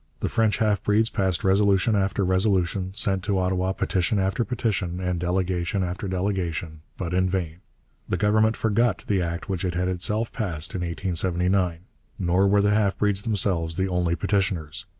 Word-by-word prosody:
The -, -, -1 dB
French 110 Hz, -2 st, +2 dB
half 105 Hz, -4 st, +1 dB
breeds 110 Hz, +2 st, +2 dB
passed 95 Hz, -4 st, 0 dB
resolution 100 Hz, +2 st, +3 dB
after 95 Hz, 0 st, 0 dB
resolution, 95 Hz, 0 st, +1 dB
sent 95 Hz, -2 st, 0 dB
to 100 Hz, -2 st, +1 dB
Ottawa 95 Hz, 0 st, 0 dB
petition 95 Hz, +1 st, 0 dB
after 95 Hz, +4 st, +1 dB
petition 100 Hz, -7 st, -2 dB
and 90 Hz, -1 st, -2 dB
delegation 90 Hz, +1 st, -1 dB
after 90 Hz, +3 st, -4 dB
delegation, 90 Hz, -4 st, -2 dB, 0.2 s
but 90 Hz, -2 st, -4 dB
in 95 Hz, 0 st, +2 dB
vain. 85 Hz, -4 st, -2 dB, 0.5 s
The -, -, 0 dB
Government 110 Hz, +1 st, +2 dB
forgot 115 Hz, +1 st, +1 dB
the 100 Hz, -3 st, +1 dB
act 85 Hz, 0 st, -3 dB
which 95 Hz, -3 st, -3 dB
it 90 Hz, -2 st, -2 dB
had 90 Hz, +1 st, 0 dB
itself 105 Hz, +5 st, -1 dB
passed 85 Hz, -8 st, -3 dB
in 95 Hz, -, -3 dB
1879. 90 Hz, 0 st, 0 dB, 0.4 s
Nor 90 Hz, +2 st, +2 dB
were 100 Hz, +1 st, +3 dB
the 105 Hz, 0 st, +3 dB
half 100 Hz, -2 st, +1 dB
breeds 100 Hz, -2 st, +1 dB
themselves 95 Hz, -7 st, -1 dB
the 95 Hz, 0 st, 0 dB
only 90 Hz, -2 st, 0 dB
petitioners. 95 Hz, -2 st, -1 dB
95 Hz, 170 wpm, -25 LUFS, 90-100 Hz, 0.5 s, resolution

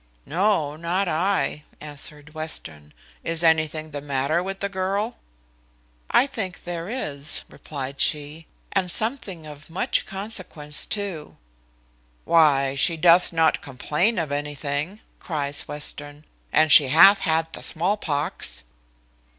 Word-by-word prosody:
"No, 165 Hz, -3 st, +1 dB
not 175 Hz, +4 st, -1 dB
I," 170 Hz, -2 st, 0 dB, 0.2 s
answered 150 Hz, 0 st, -8 dB
Western; 80 Hz, -, -7 dB, 0.3 s
"is 165 Hz, 0 st, -1 dB
anything 155 Hz, -1 st, +1 dB
the 145 Hz, -1 st, -5 dB
matter 140 Hz, +3 st, 0 dB
with 195 Hz, +1 st, -5 dB
the 200 Hz, -, -1 dB
girl?" 200 Hz, +4 st, -2 dB, 0.9 s
"I -, -, +5 dB
think 200 Hz, -9 st, -5 dB
there 175 Hz, +1 st, -5 dB
is," 150 Hz, -, -2 dB
replied 140 Hz, -2 st, -6 dB
she; 150 Hz, +2 st, 0 dB, 0.2 s
"and 190 Hz, -2 st, 0 dB
something 205 Hz, -, -1 dB
of 150 Hz, 0 st, -11 dB
much 165 Hz, -, -1 dB
consequence 185 Hz, -7 st, 0 dB
too." 195 Hz, -7 st, -4 dB, 0.9 s
"Why, 140 Hz, -5 st, +4 dB
she 165 Hz, +4 st, +2 dB
doth 175 Hz, +2 st, +5 dB
not 165 Hz, -1 st, +2 dB
complain 150 Hz, -, 0 dB
of 160 Hz, -4 st, -2 dB
anything," 145 Hz, +5 st, -3 dB, 0.2 s
cries 145 Hz, -4 st, -3 dB
Western; 145 Hz, 0 st, -6 dB, 0.3 s
"and 155 Hz, 0 st, +4 dB
she 150 Hz, -3 st, +8 dB
hath 195 Hz, +9 st, +7 dB
had 160 Hz, -1 st, 0 dB
the -, -, -6 dB
small 175 Hz, +5 st, +3 dB
pox." 145 Hz, -, -2 dB
160 Hz, 125 wpm, -23 LUFS, 145-185 Hz, 0.9 s, she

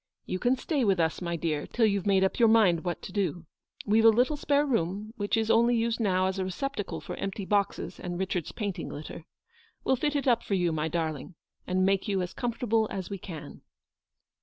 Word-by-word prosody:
You 185 Hz, -, -3 dB
can 245 Hz, +4 st, +2 dB
stay 275 Hz, +2 st, -1 dB
with 195 Hz, -5 st, +2 dB
us, 160 Hz, +1 st, 0 dB
my 170 Hz, -1 st, -2 dB
dear, 155 Hz, -2 st, -2 dB
till 235 Hz, -, +2 dB
you've 200 Hz, -2 st, 0 dB
made 195 Hz, -1 st, +4 dB
up 190 Hz, -, 0 dB
your 235 Hz, -, +6 dB
mind 195 Hz, -7 st, +4 dB
what 175 Hz, -1 st, -3 dB
to -, -, -7 dB
do. 180 Hz, -4 st, -2 dB, 0.4 s
We've 220 Hz, +2 st, +3 dB
a 225 Hz, -, +9 dB
little 245 Hz, +7 st, +3 dB
spare 290 Hz, 0 st, +2 dB
room, 210 Hz, -, -1 dB
which 205 Hz, 0 st, -1 dB
is 225 Hz, 0 st, +1 dB
only 235 Hz, +1 st, +4 dB
used 230 Hz, 0 st, 0 dB
now 185 Hz, -4 st, +2 dB
as 190 Hz, +1 st, -1 dB
a -, -, 0 dB
receptacle 205 Hz, +3 st, -4 dB
for -, -, -6 dB
empty 195 Hz, 0 st, -4 dB
boxes 200 Hz, 0 st, -1 dB
and 175 Hz, -1 st, -4 dB
RAchard, 185 Hz, -3 st, -1 dB
s -, -, -7 dB
painting 205 Hz, -4 st, -4 dB
litter. 155 Hz, +2 st, -8 dB, 0.6 s
We'll 265 Hz, -, +3 dB
fit 295 Hz, +3 st, -1 dB
it 280 Hz, -1 st, 0 dB
up 235 Hz, -2 st, +4 dB
for 200 Hz, -, -1 dB
you, 175 Hz, -2 st, +1 dB
my 155 Hz, 0 st, -1 dB
darling, 160 Hz, 0 st, -3 dB, 0.3 s
and 185 Hz, +1 st, +2 dB
make 195 Hz, +2 st, +1 dB
you 195 Hz, -3 st, 0 dB
as 180 Hz, -, -6 dB
comfortable 230 Hz, -2 st, 0 dB
as 190 Hz, 0 st, -5 dB
we 195 Hz, -, -4 dB
can." 165 Hz, -5 st, -9 dB
195 Hz, 220 wpm, -28 LUFS, 180-230 Hz, 0.6 s, a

